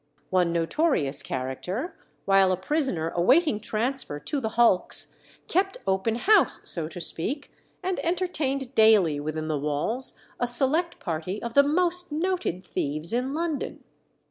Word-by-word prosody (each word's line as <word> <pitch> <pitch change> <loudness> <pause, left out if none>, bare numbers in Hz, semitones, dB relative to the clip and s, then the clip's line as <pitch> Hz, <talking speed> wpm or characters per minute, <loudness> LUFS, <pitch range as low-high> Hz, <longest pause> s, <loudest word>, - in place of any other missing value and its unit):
One 180 -2 +2
notorious 165 - 0
character, 180 - -4 0.3
while 195 -1 +4
a 185 - +1
prisoner 190 - -1
awaiting 250 - +3
transfer 225 - -2
to 275 - -3
the 220 -4 -2
hulks, 235 -6 +2 0.3
kept 385 +2 0
open 190 +4 0
house, 415 - +4
so 165 -3 0
to 170 +2 -9
speak, 225 - -1 0.3
and 370 0 -1
entertained 305 -7 -1
daily 210 - +5
within 155 +1 -4
the 155 -2 -1
walls 150 - -1 0.2
a 245 - +1
select 290 +8 +2
party 170 +3 -4
of 235 +1 -5
the 280 - +7
most 350 +4 0
noted 320 - -2
thieves 155 +3 -3
in 255 +4 -1
London. 325 -3 -3
230 Hz, 140 wpm, -26 LUFS, -, 0.3 s, the